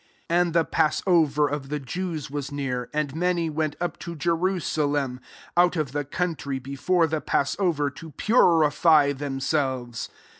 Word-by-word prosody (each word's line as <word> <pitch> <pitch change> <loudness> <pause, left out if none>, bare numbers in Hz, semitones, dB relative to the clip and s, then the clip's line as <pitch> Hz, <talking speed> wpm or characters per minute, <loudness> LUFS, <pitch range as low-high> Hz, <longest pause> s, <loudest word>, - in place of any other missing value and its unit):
55 170 - +1
And 175 -2 0
the 165 -1 +4
passover 155 -2 +2
of 140 -1 -4
the 150 0 -2
Jews 155 0 -4
was 145 -1 -4
near; 130 -4 -3
and 150 -2 -2
many 170 -1 0
went 155 -1 -1
up 175 0 -3
to 170 - -6
Jerusalem, 155 -6 0 0.4
out 175 +1 +4
of 155 -6 -1
the 145 +1 -2
country, 150 -3 -2
before 140 +7 +1
the 155 -1 -2
passover, 145 -1 0
to 160 +4 -10
purify 160 - +4
themselves. 135 -3 -2
150 Hz, 145 wpm, -25 LUFS, 140-170 Hz, 0.4 s, the